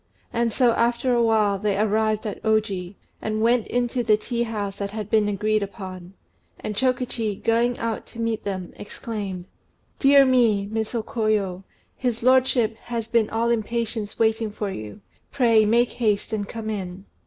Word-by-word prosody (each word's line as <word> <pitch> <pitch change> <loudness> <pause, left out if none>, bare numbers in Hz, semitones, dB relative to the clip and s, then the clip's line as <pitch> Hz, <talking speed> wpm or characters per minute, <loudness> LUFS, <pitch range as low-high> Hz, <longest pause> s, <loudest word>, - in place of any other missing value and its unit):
And 235 0 +1
so 245 +1 +3
after 235 +2 +1
a 240 - +3
while, 215 -3 +3
they 205 -1 0
arrived 215 +1 +1
at 210 - -5
Oji, 205 -4 0 0.3
and 215 0 -2
went 235 0 +3
into 245 0 0
the 215 -2 +4
tea 235 +2 -3
house 205 -4 -3
that 200 0 -2
had 210 0 -6
been 215 -2 +3
agreed 215 +1 +1
upon; 190 -2 -7 0.4
and 210 - -4
Chokichi, 245 -3 0
going 235 +3 +1
out 230 -1 -3
to 230 - -12
meet 230 -1 -1
them, 185 -3 -4
exclaimed 200 -4 -6 0.5
"Dear 275 0 +7
me, 235 -6 +3
Miss 220 +3 -3
O 225 - -1
Koyo, 215 -7 -1 0.3
his 240 -3 -2
lordship 255 -3 +3
has 230 -2 -4
been 230 -2 +2
all 230 +1 0
impatience 225 -1 -2
waiting 225 0 +1
for 205 -1 -4
you: 110 - -8 0.3
pray 230 -5 +4
make 235 +3 +3
haste 215 -3 0
and 205 -2 -2
come 220 -1 -4
in." 190 -2 -5
220 Hz, 165 wpm, -24 LUFS, 205-235 Hz, 0.5 s, Dear